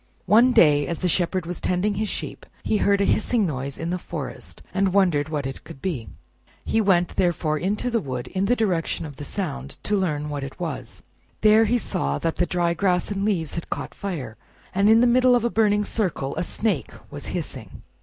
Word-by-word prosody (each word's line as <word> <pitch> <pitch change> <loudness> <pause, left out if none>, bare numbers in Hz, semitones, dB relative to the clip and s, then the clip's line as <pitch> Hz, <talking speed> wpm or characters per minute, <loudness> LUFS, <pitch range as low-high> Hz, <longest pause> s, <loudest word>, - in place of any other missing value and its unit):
One 230 +6 +6
day, 145 -9 +5
as 170 - -2
the 185 - -1
Shepherd 180 0 0
was 175 +1 -5
tending 185 +3 +1
his 210 +1 -2
sheep, - - -6 0.2
he 215 - +1
heard 200 0 +3
a - - +3
hissing 215 +1 +2
noise 140 -4 -3
in 165 +1 -3
the 180 - -1
forest, 155 -5 -7
and 195 -1 +1
wondered 160 -7 +3
what 150 -3 -2
it 135 - -6
could - - -11
he. 140 - -2 0.6
He 225 - +2
went, 180 -4 +2
therefore, 165 -4 +1
into 210 +8 -1
the 230 - +2
wood 125 -4 -4
in 190 +1 -1
the 245 +5 +3
direction 180 -7 -1
of 145 -3 -9
the 145 - -7
sound, 140 -5 -4
to 210 - 0
learn 150 -6 -1
what 145 -2 -4
it 135 - -8
was. 165 -6 -5 0.4
There 215 +1 +6
he 240 +3 +2
saw 70 - -2
that 165 - -2
the 175 - +1
dry 175 -1 +1
grass 180 +2 0
and 195 -1 -2
leaves 180 -8 0
had 170 - -5
caught - - -4
fire, 145 - -5 0.4
and 200 +2 +3
in 225 +1 +7
the - - +5
middle 250 +1 +5
of 240 - +1
a 235 - +1
burning 210 -1 +2
circle 175 -12 -2
a - - -1
Snake 180 - -1 0.2
was - - -7
hissing. - - -6
180 Hz, 215 wpm, -24 LUFS, 150-210 Hz, 0.6 s, in